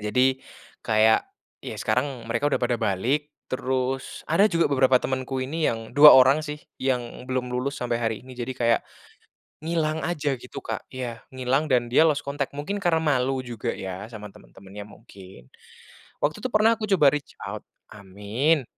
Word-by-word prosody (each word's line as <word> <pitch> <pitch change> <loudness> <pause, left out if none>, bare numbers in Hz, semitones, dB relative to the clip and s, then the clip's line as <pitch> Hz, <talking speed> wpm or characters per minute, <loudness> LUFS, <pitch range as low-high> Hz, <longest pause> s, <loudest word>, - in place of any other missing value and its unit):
jadi 130 +5 +1 0.4
kayak 110 0 +4 0.4
ya - - -7
sekarang 130 -2 -1
mereka 115 +6 +1
udah - - +1
pada 120 -1 0
balik 115 +9 0 0.2
terus 130 0 -2
ada 195 +7 +4
juga 170 -4 +2
beberapa 130 -1 +4
temenku 130 +1 -3
ini 155 +4 -1
yang 115 0 -4
2 145 +2 +10
orang 130 +3 +6
sih 150 -1 -6 0.2
yang 125 -1 -2
belum 125 -1 -2
lulus 135 +3 -2
sampai 120 -1 -2
hari 110 -2 -1
ini 130 - -11
jadi 125 +1 -5
kayak, 115 -2 +2 0.8
ngilang 160 -1 -1
aja 150 -5 -1
gitu 125 - -9
Kak - - -5
iya 120 -3 -5
ngilang 130 +4 0
dan 120 -2 +2
dia 155 +6 +5
lost 145 -2 +1
contact 140 0 -3
mungkin 150 +8 -3
karena 165 -3 +2
malu 135 -3 +1
juga 120 -3 -4
ya 95 +1 -6
sama 105 -3 -9
temen-temennya 100 +11 -12
mungkin, 95 - -15 0.7
waktu 155 +8 -1
itu 255 - -1
pernah 215 +2 +4
aku 215 - -3
coba 145 -5 +5
reach 150 -1 -4
out - - -5 0.3
amin, 105 - -1
130 Hz, 165 wpm, -25 LUFS, 115-145 Hz, 0.8 s, 2